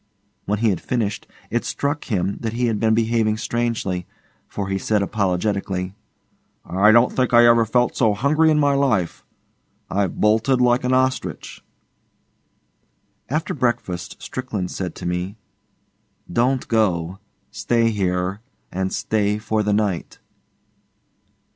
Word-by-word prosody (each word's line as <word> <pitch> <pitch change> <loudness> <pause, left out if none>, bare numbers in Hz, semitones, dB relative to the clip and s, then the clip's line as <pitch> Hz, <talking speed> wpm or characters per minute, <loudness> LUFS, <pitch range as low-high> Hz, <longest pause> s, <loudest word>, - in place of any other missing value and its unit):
When 105 - 0
he 110 +1 +2
had 90 - -3
finished, 110 -5 -2 0.2
it - - 0
struck 145 +1 -2
him 100 -3 -1
that 115 -1 -3
he 120 +1 0
had 110 -3 0
been 110 -1 +3
behaving 110 -1 +1
strangely, 110 -6 -2 0.4
for 100 -2 -4
he 95 0 -1
said 105 +1 +1
apologetically, 95 -1 -1 0.7
'I 100 +4 +4
don't 115 +2 +5
think 125 -2 +2
I 120 0 +8
ever 115 -1 +5
felt 120 +2 +1
so 110 -4 +2
hungry 150 +8 +3
in 155 - +3
my 145 -1 +3
life. 125 -11 0 0.7
I've 100 -2 -1
bolted 115 +5 +3
like 125 0 +3
an 125 - 0
ostrich.' 130 0 -2 1.7
After 155 +4 -1
breakfast 95 - -2
Strickland 110 -8 -4
said 90 -3 -4
to - - -8
me, 90 +4 -3 1.0
'Don't 125 +4 +1
go. 95 -5 0 0.3
Stay 115 +2 +1
here, 95 0 -1 0.3
and 95 +1 -2
stay 105 -1 0
for 110 0 -1
the 105 0 0
night. 100 -5 -1
110 Hz, 135 wpm, -21 LUFS, 95-120 Hz, 1.7 s, I